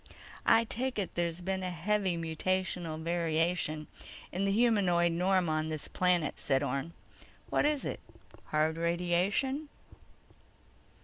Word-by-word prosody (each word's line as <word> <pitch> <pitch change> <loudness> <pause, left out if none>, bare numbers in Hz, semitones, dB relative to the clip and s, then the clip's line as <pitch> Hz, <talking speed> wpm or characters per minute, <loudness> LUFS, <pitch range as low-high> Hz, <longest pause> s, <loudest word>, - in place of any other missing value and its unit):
"I 225 - +6
take 250 +3 -1
it 200 -3 -2
there's 170 0 -1
been 190 +1 -2
a 185 - -2
heavy 185 +1 0
mutational 165 0 -2
variation 165 -2 0 0.5
in 190 +3 -1
the 195 - +2
humanoid 195 -6 +3
norm 180 +1 +2
on 155 0 0
this 155 -2 -4
planet," 180 -3 +1
said 135 0 +1
Orne. 140 +4 -2 0.6
"What - - +3
is 300 -2 0
it? - - -3 0.5
Hard 155 +1 +1
radiation?" 180 - 0
175 Hz, 125 wpm, -31 LUFS, 165-195 Hz, 0.6 s, I